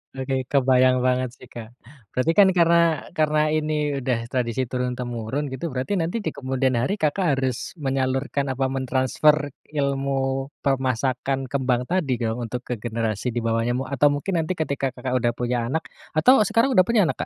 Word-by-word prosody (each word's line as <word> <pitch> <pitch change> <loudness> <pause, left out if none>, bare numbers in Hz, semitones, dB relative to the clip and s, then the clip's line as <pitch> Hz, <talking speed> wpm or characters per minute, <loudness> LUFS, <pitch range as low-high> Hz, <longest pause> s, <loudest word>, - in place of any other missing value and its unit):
Oke, 130 -1 -2
kebayang 130 -2 +4
banget 130 0 +1
sih, - - -15
Kak. 115 -2 -8 0.5
Berarti 130 +6 +2
kan 195 - +8
karena 170 -2 +3
karena 155 -2 +1
ini 150 -2 0
udah 125 -3 -1
tradisi 125 0 -1
turun-temurun, 125 0 -3
gitu, 130 +6 -4
berarti 140 +8 -2
nanti 175 +7 -2
di - - -2
kemudian 130 -2 -1
hari 185 - 0
Kakak 155 -3 +1
harus 130 +2 -3
menyalurkan, 135 -1 -1
apa, 130 0 -1
mentransfer 135 +3 +1 0.2
ilmu 135 -2 -1 0.2
permasakan 130 0 -1
kembang 130 -3 +1
tadi 160 -9 +1
kalau 115 +1 -1
untuk 125 +2 -5
ke 125 - -4
generasi 115 -1 -2
di 120 - -1
bawahnya 115 +1 0
mu 130 - -1
atau 140 +2 +2
mungkin 145 +5 0
nanti 165 +3 -1
ketika 140 -5 -2
Kakak 125 0 -4
udah 120 -1 +1
punya 120 -1 -1
anak 160 +6 -1 0.3
atau 175 +13 +6
sekarang 230 +5 +2
udah 185 -8 +5
punya 230 -3 +4
anak, 165 - -1
135 Hz, 165 wpm, -23 LUFS, 125-150 Hz, 0.5 s, kan